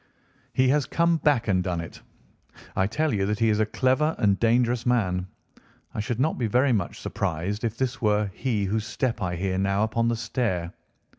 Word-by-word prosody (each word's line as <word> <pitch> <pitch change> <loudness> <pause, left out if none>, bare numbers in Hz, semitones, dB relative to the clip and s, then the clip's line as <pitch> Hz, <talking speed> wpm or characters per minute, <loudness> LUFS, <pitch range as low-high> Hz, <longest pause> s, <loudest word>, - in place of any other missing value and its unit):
"He 130 - +3
has 145 +1 +2
come 170 0 +2
back 145 -7 +2
and 95 -3 +2
done 90 -2 -2
it. 85 - -8 0.7
I 95 - +2
tell 155 +6 0
you 100 -2 0
that 105 0 0
he 115 0 +2
is 105 0 +2
a 110 - +2
clever 130 +7 +1
and 100 -2 +2
dangerous 120 +1 +2
man. 95 -7 +1 0.7
I - - -4
should 115 +2 -2
not 155 +5 +1
be 120 - +1
very 125 +4 +3
much 95 -6 -2
surprised 95 +8 -3
if 115 -1 -2
this 130 0 -2
were 105 -2 +1
he 110 -4 -1
whose 105 +2 -1
step 120 0 -2
I 90 -2 -1
hear 95 +1 -1
now 100 +1 +1
upon 115 +1 0
the 120 - +1
stair. 110 -7 -2
110 Hz, 200 wpm, -25 LUFS, 100-125 Hz, 0.7 s, He